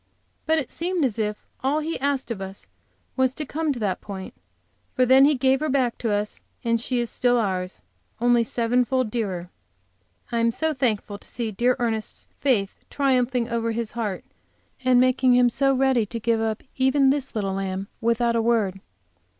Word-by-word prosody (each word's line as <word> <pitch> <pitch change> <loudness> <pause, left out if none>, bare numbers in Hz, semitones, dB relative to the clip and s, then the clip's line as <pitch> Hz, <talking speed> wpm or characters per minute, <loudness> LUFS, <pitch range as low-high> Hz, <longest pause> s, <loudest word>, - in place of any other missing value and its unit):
But 320 0 +3
it 285 -6 -2
seemed 345 -2 -1
as 230 -3 -2
if 210 -1 -2 0.2
all 275 +3 +2
He 315 +2 -2
asked 275 -2 -1
of 205 -4 -4
us 190 0 -7 0.5
was 260 -1 +1
to 305 - -4
come 315 +2 -1
to 270 - -3
that 200 -5 -2
point, 195 -2 -7 0.6
for 255 - +4
then 260 +2 +7
He 295 +1 +4
gave 265 +1 +2
her 310 +1 -1
back 260 -3 +1
to 230 - -1
us, 205 +1 -2 0.2
and 230 -1 +1
she 250 +1 0
is 240 - 0
still 245 +1 +2
ours, 185 -4 -2 0.4
only 240 0 +4
seven 235 +2 +1
fold 255 -3 0
dearer. 185 -6 -3 0.8
I 235 -1 +1
was 230 0 +1
so 315 0 +1
thankful 215 -6 -1
to - - -17
see 235 -2 -3
dear 245 +5 +2
Ernest's 225 -3 -3
faith 220 -8 +1
triumphing 255 -3 +1
over 230 -1 -1
his 230 -1 -3
heart, 215 -5 -3 0.6
and 255 -1 +5
making 255 0 +4
him 245 0 +5
so 270 +3 +2
ready 260 -4 +2
to 230 +2 -5
give 225 0 +1
up 220 -1 -2
even 265 +1 +4
this 270 -3 -3
little 195 -3 -1
lamb 195 0 -3
without 235 +1 +2
a 230 - +2
word. 215 -5 +1
240 Hz, 190 wpm, -24 LUFS, 220-260 Hz, 0.8 s, then